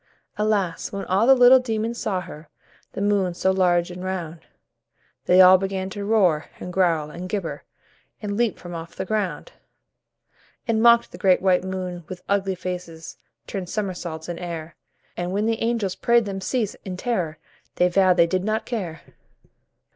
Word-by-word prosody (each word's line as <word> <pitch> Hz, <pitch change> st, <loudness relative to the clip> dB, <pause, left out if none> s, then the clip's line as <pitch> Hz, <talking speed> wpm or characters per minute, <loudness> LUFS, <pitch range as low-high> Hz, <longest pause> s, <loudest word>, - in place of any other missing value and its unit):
Alas! 205 Hz, -5 st, -1 dB
when 200 Hz, -1 st, -5 dB
all 195 Hz, +5 st, +2 dB
the 270 Hz, -, +8 dB
little 250 Hz, +1 st, +7 dB
demons 230 Hz, -1 st, -3 dB
saw 190 Hz, -3 st, -1 dB
her, 155 Hz, -3 st, -11 dB, 0.4 s
The 195 Hz, -, -3 dB
moon, 200 Hz, -4 st, +1 dB
so 190 Hz, +2 st, +1 dB
large 180 Hz, -2 st, +2 dB
and 180 Hz, +1 st, -8 dB
round, 175 Hz, -3 st, -4 dB, 0.9 s
They 180 Hz, +1 st, +6 dB
all 185 Hz, 0 st, +8 dB
began 190 Hz, 0 st, -3 dB
to 200 Hz, +1 st, -5 dB
roar, 190 Hz, -8 st, +2 dB
and 180 Hz, -, -7 dB
growl, 165 Hz, -5 st, +1 dB
and 180 Hz, +3 st, -7 dB
gibber, 195 Hz, -5 st, -4 dB, 0.5 s
And 205 Hz, -1 st, -4 dB
leap 235 Hz, -1 st, 0 dB
from 175 Hz, -1 st, -9 dB
off 165 Hz, 0 st, -8 dB
the 190 Hz, -, -4 dB
ground; 195 Hz, -7 st, -2 dB, 1.2 s
And 225 Hz, -1 st, +1 dB
mocked 235 Hz, 0 st, +5 dB
the -, -, -11 dB
great 185 Hz, -2 st, +4 dB
white 185 Hz, -1 st, +2 dB
moon 185 Hz, -2 st, -5 dB
with 180 Hz, -1 st, -8 dB
ugly 195 Hz, -1 st, 0 dB
faces, 180 Hz, -3 st, -7 dB, 0.3 s
Turned 185 Hz, -3 st, -5 dB
somersaults 175 Hz, -6 st, -4 dB
in 175 Hz, -1 st, -5 dB
air, 170 Hz, -2 st, -6 dB, 0.4 s
And 175 Hz, +1 st, -3 dB
when 205 Hz, +2 st, 0 dB
the 225 Hz, 0 st, -1 dB
angels 225 Hz, -5 st, 0 dB
prayed 235 Hz, +3 st, +2 dB
them 195 Hz, -1 st, -5 dB
cease, 215 Hz, +1 st, -1 dB
in 185 Hz, -2 st, -6 dB
terror, 180 Hz, -9 st, -2 dB, 0.4 s
They 180 Hz, -, +3 dB
vowed 185 Hz, 0 st, +3 dB
they 170 Hz, -, +6 dB
did 185 Hz, +2 st, -1 dB
not 215 Hz, +2 st, -1 dB
care. 180 Hz, -10 st, -4 dB
185 Hz, 170 wpm, -23 LUFS, 175-210 Hz, 1.2 s, the